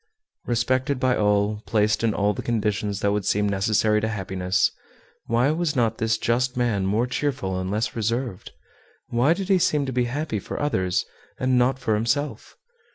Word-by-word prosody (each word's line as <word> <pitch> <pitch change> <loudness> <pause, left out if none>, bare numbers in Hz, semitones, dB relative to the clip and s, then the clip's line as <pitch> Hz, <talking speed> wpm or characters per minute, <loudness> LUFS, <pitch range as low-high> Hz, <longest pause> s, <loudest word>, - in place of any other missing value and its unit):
Respected 130 +3 0
by 130 -1 +2
all, 105 0 +1
placed 105 0 +1
in 115 - +3
all 105 0 +2
the - - -5
conditions 105 -3 -1
that 100 - +2
would 105 0 0
seem 105 +2 +1
necessary 105 +2 +2
to 110 - 0
happiness, 95 -3 0 0.6
why 120 +5 +2
was 160 -1 -1
not 115 -3 +1
this 110 0 +1
just 125 +3 0
man 110 -6 +1
more 110 +5 +1
cheerful 125 -8 -2
and 95 0 -3
less 105 +3 -1
reserved? 115 -2 -2 0.6
Why 125 +7 +3
did 195 0 -4
he 195 -2 +4
seem 150 -4 +2
to 130 - -4
be 125 0 +1
happy 130 -2 -2
for - - -6
others 95 -12 0 0.3
and 130 0 +1
not 125 +1 +3
for 110 -4 -1
himself? 120 +7 -2
115 Hz, 175 wpm, -24 LUFS, 105-130 Hz, 0.6 s, he